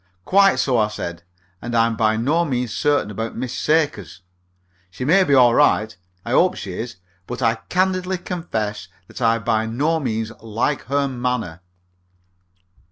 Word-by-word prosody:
"Quite 195 +1 +5
so," 125 -4 +2
I 105 - +3
said, 85 -5 -6 0.4
"and 120 0 -4
I'm 115 0 +3
by 110 0 +1
no 150 +9 +1
means 125 - -2
certain 145 -1 +1
about 115 +2 -5
Miss 125 0 -4
Sakers. 150 - 0 0.7
She 95 +8 -6
may 190 +7 +5
be 140 -6 +3
all 125 -2 +6
right. 110 -6 +3 0.3
I 120 - -4
hope 180 +8 +3
she 95 - -6
is. 115 +5 -5 0.3
But 125 +1 -5
I 115 -1 +2
candidly 185 0 0
confess 110 - -4 0.2
that - - -10
I 115 -1 +3
by 110 -1 0
no 150 +8 0
means 115 -5 -2
like 115 +6 -2
her 140 +1 0
manner." 125 -9 -3
120 Hz, 160 wpm, -21 LUFS, 110-150 Hz, 0.7 s, all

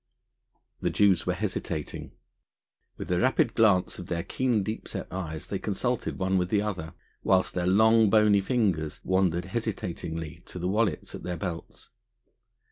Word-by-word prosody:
The - - +1
Jews 95 -5 +3
were - - +1
hesitating. 75 -2 -4 0.8
With - - -6
a 90 - +2
rapid 115 +1 +2
glance 100 -6 +3
of 90 - -7
their 85 -1 -2
keen, 125 -6 0
deep 110 +3 -5
set - - -4
eyes 80 -5 -4
they - - -3
consulted - - -2
one 95 0 +1
with 90 0 -1
the 105 0 +2
other, 90 -7 -4 0.3
whilst 95 -1 +2
their 90 -1 -1
long 110 +3 +5
bony 105 -1 +5
fingers 95 - 0
wandered 95 -2 +1
hesitatingly 85 -6 -4
to - - -8
the 90 0 -2
wallets 100 -4 0
at - - -7
their 90 -1 -4
belts. 85 -3 -7
95 Hz, 155 wpm, -27 LUFS, 85-105 Hz, 0.8 s, long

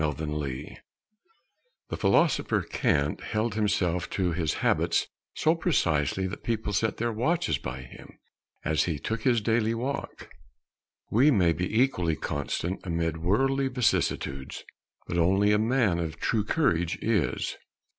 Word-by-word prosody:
COURAGE 75 -3 -3 1.1
The - - -3
philosopher 170 -5 +2
Kant 70 +1 0
held 110 +1 -1
himself 95 -5 0
to 90 -3 0
his 80 -2 -1
habits - - +2 0.3
so 155 - +3
precisely 95 - +1
that 95 +2 -5
people 110 -3 -2
set 110 +1 0
their 120 +1 -1
watches 165 +11 0
by 65 0 -6
him 65 - -14 0.5
as 80 -1 +2
he 80 -4 -1
took 110 +8 -3
his 120 -2 +2
daily 110 +1 +1
walk. 130 +4 -5 0.8
We 130 +8 +5
may 90 - +4
be 90 +6 -1
equally 90 -12 +2
constant 75 +6 -3
amid 85 -2 -1
worldly 135 +11 +1
vicissitudes, 100 - -1 0.4
but 85 - -2
only 95 +4 +3
a 105 - +3
man 110 -6 +2
of 80 -1 -4
true 105 +2 0
courage 90 - +1
is. 105 -7 0
95 Hz, 135 wpm, -27 LUFS, 80-115 Hz, 1.1 s, We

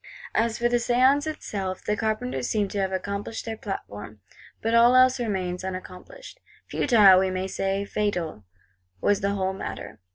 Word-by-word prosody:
As 225 0 +1
for 240 - +1
the 240 0 +2
Séance 255 +5 +3
itself, 195 -11 -4
the 210 - 0
Carpenters 135 - -2
seem 210 -2 +1
to 205 - -3
have 190 -1 0
accomplished 200 +3 -4
their 225 -1 -4
platform; 110 - -7 0.4
but 225 +1 -1
all 235 +2 +6
else 255 0 +5
remains 185 -6 -2
unaccomplished. 190 - -8 0.3
Futile, 210 -8 +5
we 190 0 +1
may 185 0 -2
say 195 +1 -2
fatal, 180 - -2 0.6
was 205 - +1
the 200 +1 0
whole 190 -1 -1
matter. 190 - -7
200 Hz, 160 wpm, -25 LUFS, 185-235 Hz, 0.6 s, all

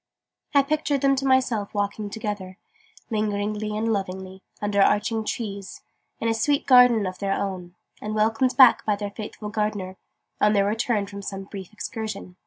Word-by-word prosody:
I 280 - +6
pictured 295 -1 0
them 275 -1 +4
to 270 +1 -1
myself 255 -6 +1
walking 205 +1 -2
together, 205 -3 -5 0.5
lingeringly 210 0 -1
and 225 +1 0
lovingly, 190 -1 -5 0.2
under 205 -1 +1
arching 220 +3 +2
trees, 200 -3 -5 0.4
in 230 - -1
a 225 - +2
sweet 280 +6 +1
garden 250 -5 +6
of 185 0 -5
their 195 -1 0
own, 185 -3 -4 0.3
and 215 0 -4
welcomed 225 +4 +1
back 260 -4 +7
by 210 - +1
their 200 0 -5
faithful 210 0 -7
gardener, 210 -3 -2 0.4
on 210 0 +4
their 200 -1 +3
return 215 0 0
from 200 0 -8
some 195 0 -5
brief 195 -1 -9
excursion. 210 -3 -6
210 Hz, 165 wpm, -24 LUFS, 200-225 Hz, 0.5 s, back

